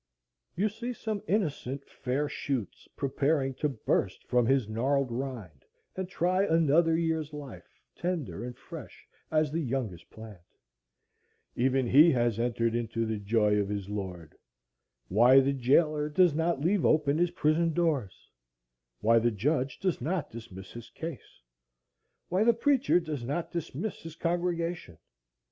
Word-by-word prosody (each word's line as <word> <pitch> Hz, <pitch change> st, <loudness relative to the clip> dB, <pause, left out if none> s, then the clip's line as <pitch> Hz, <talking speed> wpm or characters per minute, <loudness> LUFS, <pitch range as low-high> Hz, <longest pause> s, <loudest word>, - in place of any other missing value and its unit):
You 195 Hz, +5 st, +1 dB
see 235 Hz, +4 st, -5 dB
some 215 Hz, -3 st, -4 dB
innocent 145 Hz, -, -1 dB
fair 135 Hz, +3 st, -2 dB
shoots 130 Hz, -8 st, -4 dB
preparing 140 Hz, 0 st, 0 dB
to 150 Hz, -, +2 dB
burst 105 Hz, -6 st, -1 dB
from 125 Hz, -2 st, +2 dB
his 135 Hz, -4 st, +2 dB
gnarled 130 Hz, +4 st, 0 dB
rind 115 Hz, -, -6 dB, 0.3 s
and 185 Hz, -1 st, -4 dB
try 185 Hz, +1 st, +1 dB
another 165 Hz, -1 st, +3 dB
year's 160 Hz, -2 st, -1 dB
life, 145 Hz, -5 st, -10 dB, 0.2 s
tender 170 Hz, -9 st, -3 dB
and 125 Hz, 0 st, -7 dB
fresh -, -, -11 dB, 0.2 s
as 155 Hz, -2 st, +1 dB
the 165 Hz, +2 st, -1 dB
youngest 120 Hz, -, -3 dB
plant. 110 Hz, -5 st, -11 dB, 1.1 s
Even 130 Hz, +1 st, +2 dB
he 145 Hz, +7 st, +7 dB
has 120 Hz, -3 st, +1 dB
entered 115 Hz, -1 st, 0 dB
into 115 Hz, -1 st, -1 dB
the 110 Hz, -1 st, -2 dB
joy 105 Hz, 0 st, +2 dB
of 100 Hz, -1 st, -1 dB
his 100 Hz, -1 st, -4 dB
Lord. 90 Hz, -6 st, -6 dB, 0.7 s
Why 120 Hz, -, +6 dB
the 135 Hz, +1 st, +2 dB
jailer 150 Hz, +4 st, +2 dB
does 175 Hz, +1 st, +4 dB
not 160 Hz, -1 st, 0 dB
leave 180 Hz, +4 st, +2 dB
open 150 Hz, -1 st, +3 dB
his 175 Hz, 0 st, +3 dB
prison 165 Hz, 0 st, +1 dB
doors,—why -, -, -2 dB
the 120 Hz, +1 st, +2 dB
judge 130 Hz, +5 st, -1 dB
does 185 Hz, -8 st, -1 dB
not 165 Hz, +3 st, -2 dB
dismis 95 Hz, -5 st, -10 dB
his 115 Hz, -1 st, -10 dB
case,—why -, -, -7 dB
the 235 Hz, 0 st, +4 dB
preacher 265 Hz, -5 st, +3 dB
does 150 Hz, -7 st, -5 dB
not 145 Hz, +7 st, -3 dB
dismiss 175 Hz, +5 st, -4 dB
his 165 Hz, -1 st, -9 dB
congregation! 170 Hz, -, -2 dB
135 Hz, 140 wpm, -29 LUFS, 115-165 Hz, 1.1 s, he